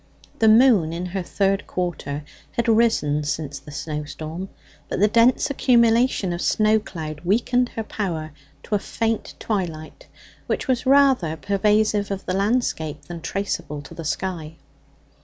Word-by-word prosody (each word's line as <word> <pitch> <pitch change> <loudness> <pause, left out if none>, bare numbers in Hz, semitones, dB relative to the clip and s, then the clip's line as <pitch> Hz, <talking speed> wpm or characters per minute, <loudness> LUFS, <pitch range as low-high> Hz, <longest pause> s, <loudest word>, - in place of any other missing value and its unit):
The 225 - +4
moon, 220 -8 +5
in 175 +2 -3
her 185 +2 -3
third 195 +2 0
quarter, 155 -5 -3 0.3
had 235 0 -1
risen 220 -11 +2
since 145 -1 -3
the 140 - -14
snowstorm; 155 +4 -5 0.4
but - - -2
the 205 - +5
dense 235 +6 +3
accumulation 235 -6 +3
of 170 - -4
snow 215 0 +3
cloud 155 -7 -7
weakened 245 +6 +2
her 225 - -2
power 170 -8 -4 0.3
to - - -6
a 205 - +3
faint 225 +2 -2
twilight, 170 -7 -4 0.4
which - - -2
was 255 -1 0
rather 265 - +4
pervasive 205 +3 +1
of 195 -1 -4
the 185 - -2
landscape 195 - -1
than 170 -1 -8
traceable 160 -6 -3
to - - -12
the 165 - -7
sky. 165 -1 -3
195 Hz, 145 wpm, -23 LUFS, 160-225 Hz, 0.4 s, moon